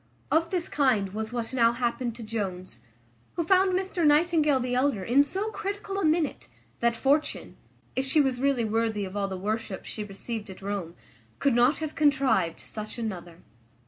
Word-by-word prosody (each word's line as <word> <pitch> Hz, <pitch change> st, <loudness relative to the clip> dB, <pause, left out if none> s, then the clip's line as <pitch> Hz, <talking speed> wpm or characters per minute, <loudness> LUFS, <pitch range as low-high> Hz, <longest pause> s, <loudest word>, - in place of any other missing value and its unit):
Of 330 Hz, +1 st, +3 dB
this 355 Hz, -2 st, -1 dB
kind 220 Hz, -9 st, +1 dB
was 220 Hz, +1 st, -4 dB
what 235 Hz, 0 st, -3 dB
now 235 Hz, -2 st, +4 dB
happened 240 Hz, -1 st, -2 dB
to 235 Hz, -, -8 dB
Jones, 190 Hz, -, -4 dB, 0.6 s
who 340 Hz, -, 0 dB
found 375 Hz, +2 st, +4 dB
Mr 370 Hz, -2 st, -1 dB
Nightingale 300 Hz, -2 st, +4 dB
the 250 Hz, 0 st, -2 dB
elder 255 Hz, -6 st, +1 dB
in 250 Hz, +8 st, +4 dB
so 390 Hz, +9 st, -1 dB
critical 400 Hz, -1 st, -4 dB
a -, -, -1 dB
minute, 315 Hz, -1 st, +1 dB, 0.3 s
that 235 Hz, 0 st, +2 dB
Fortune, 285 Hz, +5 st, 0 dB, 0.4 s
if 260 Hz, -, +1 dB
she 270 Hz, +3 st, +2 dB
was 265 Hz, -3 st, +1 dB
really 270 Hz, -4 st, +2 dB
worthy 220 Hz, -1 st, 0 dB
all 200 Hz, +1 st, -2 dB
the 190 Hz, -1 st, -5 dB
worship 210 Hz, +1 st, -3 dB
she 215 Hz, -, -5 dB
received 210 Hz, +1 st, -5 dB
at 190 Hz, 0 st, -10 dB
Rome, 195 Hz, -4 st, -4 dB, 0.4 s
could 280 Hz, -3 st, +2 dB
not 240 Hz, +5 st, +4 dB
have 315 Hz, -1 st, -4 dB
contrived 265 Hz, -, +2 dB
such 215 Hz, +2 st, -7 dB
another. 180 Hz, -7 st, -6 dB
240 Hz, 175 wpm, -27 LUFS, 210-300 Hz, 0.6 s, now